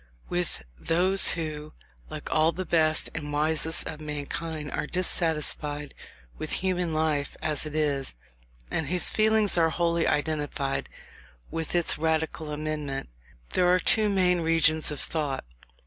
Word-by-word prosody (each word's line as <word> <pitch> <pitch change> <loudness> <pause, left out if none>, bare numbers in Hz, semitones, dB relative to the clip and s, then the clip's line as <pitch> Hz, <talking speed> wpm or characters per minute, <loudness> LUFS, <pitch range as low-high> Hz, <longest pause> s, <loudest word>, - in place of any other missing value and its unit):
With 175 - -2 0.2
those 185 +4 +5
who, 155 -2 -5 0.4
like - - -7
all 155 +1 +3
the 185 +3 -5
best 155 -2 +2
and 150 -2 -5
wisest 155 +2 +3
of 155 -1 -6
mankind, 150 0 -5
are - - -3
dissatisfied 150 -4 0 0.5
with - - -4
human 180 -2 0
life 155 -2 -1
as 155 0 -1
it 150 - -7
is, 145 - -1 0.6
and 160 - -1
whose 180 +3 +4
feelings 215 -3 +3
are 165 -1 +3
wholly 170 0 0
identified 145 -2 -2 0.6
with 165 +1 -4
its 175 -3 +2
radical 160 0 -1
amendment, 150 - -4 0.4
there 180 -1 +3
are 180 - +5
two 215 +3 +3
main 180 -3 +2
regions 160 -1 +2
of 150 -2 -4
thought. 150 -4 -3
160 Hz, 135 wpm, -26 LUFS, 150-170 Hz, 0.6 s, those